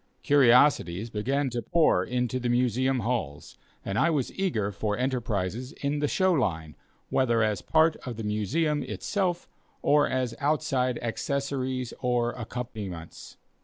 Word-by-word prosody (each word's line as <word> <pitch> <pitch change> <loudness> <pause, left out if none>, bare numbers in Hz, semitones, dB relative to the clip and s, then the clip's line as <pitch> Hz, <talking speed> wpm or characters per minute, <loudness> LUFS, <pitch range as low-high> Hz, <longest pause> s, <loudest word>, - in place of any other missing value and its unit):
Curiosities 125 - +4
began 135 +6 -1
to 120 0 -2
pour 155 - +3
into 125 +2 -1
the 125 -1 -2
Museum 125 +1 +1
halls, 110 - -3 0.3
and 100 +1 -1
I 170 - +4
was 145 -6 -1
eager 115 - -1
for 105 +1 -2
enterprises 120 -2 -2
in 145 +1 -2
the 145 - +1
show 185 +4 +2
line, 80 - -1 0.4
whether 120 -3 +2
as 105 -3 0
part 160 0 +3
of 120 -4 -7
the 115 - -5
Museum 145 - 0
itself, 175 +6 -2 0.4
or 145 0 +4
as 130 -2 -1
outside 135 -4 0
accessories 130 0 -2
or 120 -1 +1
accompaniments. 110 -8 -7
125 Hz, 135 wpm, -27 LUFS, 110-140 Hz, 0.4 s, Curiosities